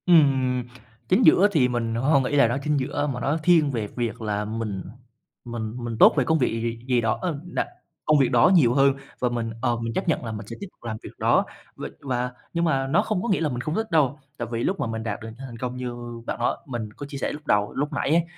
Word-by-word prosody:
Ừm, 135 -7 +4 0.5
chính 205 +6 +4
giữa 200 - +7
thì 145 -9 +4
mình 115 -2 -1
h - - -1
hông 140 0 +4
nghĩ 130 - -1
là 140 -4 +6
nó 120 +3 -1
chính 150 0 +1
giữa, 145 +2 -1
mà 120 - -5
nó 140 +5 0
thiên 160 -5 +4
về 115 -5 -2
việc 115 -2 -3
là 105 -1 -1
mình 110 -3 -4 0.6
mình 115 -2 -4
mình 120 -2 -4
tốt - - +8
về - - +4
công 160 0 +2
việc 125 - +2
gì 115 - -2
gì 115 0 -4
gì 125 -2 +3
đó, 110 -1 0
ờm, 170 -6 -2
nà 175 - -2 0.4
công 155 -1 +4
việc 135 - +3
đó 120 +4 +5
nhiều 125 -9 +5
hơn 140 0 +5 0.3
và 125 - +1
mình, 115 -1 -2
ờ, 120 -1 +2
mình 115 0 -3
chấp - - -2
nhận - - 0
là 115 - -3
mình 105 -1 -7
sẽ - - -6
tiếp 200 - -6
tục - - -31
làm 110 -2 -4
việc - - -7
đó, - - +3 0.3
v - - -9 0.2
và 125 -2 -2 0.2
nhưng 170 0 +1
mà 135 -4 +1
nó 145 +5 +3
không 215 -4 -1
có 235 - -2
nghĩa 195 - +2
là 155 - +1
mình 120 -2 -3
không 155 +5 -3
thích 220 -1 -2
đâu. 150 -3 +2 0.2
Tại 120 - -3
vì 115 0 -1
lúc 195 - 0
mà - - -1
mình 110 0 -4
đạt 105 -1 -3
được 110 - -7
những 110 +1 -10
thành 120 -2 -9
công 125 +1 -4
như 125 -1 -4 0.3
bạn - - -4
nó 120 - +1
mình 120 -5 -4
có 145 - -7
chia 140 0 -7
sẻ - - -2
lúc 150 0 -9
đầu, 105 0 +2
lúc 145 +3 -2
nãy 140 - -1
ấy, 165 +2 +4
125 Hz, 280 wpm, -25 LUFS, 115-150 Hz, 0.6 s, tốt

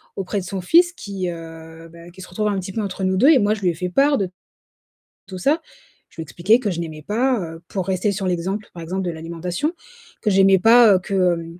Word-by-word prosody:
auprès 195 +1 -3
de 185 - -7
son 190 0 -5
fils, 345 - +4
qui, 195 - -5
heu, 165 0 -10
ben 170 +1 -13
qui 190 - -13
se - - -10
retrouve 210 +4 -2
un 200 -2 0
petit 190 +1 -6
peu 225 - -2
entre 195 -1 -5
nous 185 0 +1
2 275 +9 +5
et 305 - +7
moi 205 +1 +2
je 210 - -6
lui 180 - +2
ai - - 0
fait 180 +1 -4
part 280 +8 +3
de 190 -3 -2 1.0
tout 185 -1 -7
ça. 290 - +1 0.5
Je - - -25
lui 160 - -5
expliqué 180 - +2
que 210 -5 -2
je 170 -1 -3
n'aimais 155 -2 -7
pas 240 - 0
heu 165 -1 -7
pour 190 -2 -3
rester 190 +2 0
sur 195 -1 -3
l'exemple, 190 +4 -3
par 170 - -8
exemple 185 +4 -3
de 175 - -2
l'alimentation, 170 - -4 0.5
que 210 - +1
j'aimais 195 0 +5
pas, 225 -2 +6
que, 195 +2 -5
heu, 175 -3 +1
190 Hz, 245 wpm, -21 LUFS, 170-210 Hz, 1.0 s, et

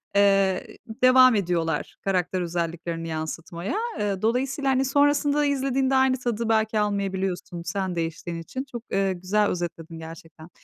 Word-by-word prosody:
eee, 195 -2 +2 0.3
devam 255 -1 +7
ediyorlar 170 -5 -1
karakter 185 -1 0
özelliklerini 170 -1 -3
yansıtmaya. 165 - -4 0.2
Eee, 200 -2 -1
dolayısıyla, 265 +5 0
hani, 265 0 +2
sonrasında 290 +1 +3
izlediğinde 270 -1 +1
aynı 265 -1 +3
tadı 235 -2 -2
belki 220 -1 +2
almayabiliyorsun, 195 -3 -2
sen 185 0 -2
değiştiğin 165 +1 -3
için. 260 +10 -5
Çok, 240 -2 -6
eee, 195 -1 +1
güzel 190 +4 +1
özetledin 165 -2 -4
gerçekten. 160 0 -11
195 Hz, 130 wpm, -25 LUFS, 170-250 Hz, 0.3 s, devam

